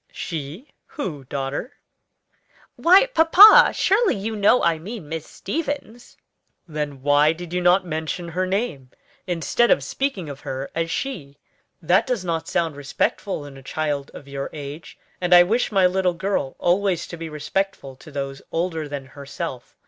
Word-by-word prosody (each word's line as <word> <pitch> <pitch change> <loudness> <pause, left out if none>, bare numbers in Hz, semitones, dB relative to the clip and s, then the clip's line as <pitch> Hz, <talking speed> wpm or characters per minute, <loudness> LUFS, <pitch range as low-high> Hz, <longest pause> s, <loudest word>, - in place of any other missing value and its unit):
"She? 165 - -6 0.2
who, 155 - -6
daughter?" 135 - -4 1.0
"Why, 370 +7 +6
papa, 395 -1 +8
surely 420 +2 +2
you 215 +3 -4
know 210 +4 +4
I 165 -2 +2
mean 195 -1 -8
Miss 160 0 -5
Stevens!" 245 - -5 0.5
"Then 150 -4 -5
why 145 +2 +4
did 175 +1 -9
you 180 - 0
not 180 +2 +4
mention 160 +1 -4
her 185 +3 -1
name, 185 - -2 0.4
instead 180 +7 +1
of - - +3
speaking 265 - -3
of 140 -1 -8
her 135 0 -6
as 165 0 -2
she? 160 - -4 0.5
That 175 +4 +3
does 240 -8 -2
not 165 -1 -2
sound 165 -3 -1
respectful 145 +4 -2
in 140 -1 -11
a - - -12
child 145 0 -3
of 140 - -11
your 140 0 -5
age, 145 +1 -8 0.2
and 180 0 +5
I 175 - +9
wish 225 +7 0
my 195 -3 +4
little 180 -1 +1
girl 190 -7 -2
always 180 -1 +1
to - - -8
be 165 -1 -7
respectful 150 -2 -3
to 155 - -14
those 135 -1 -5
older 165 -3 -2
than 140 -2 -5
herself. 140 0 -8
170 Hz, 160 wpm, -22 LUFS, 145-195 Hz, 1.0 s, I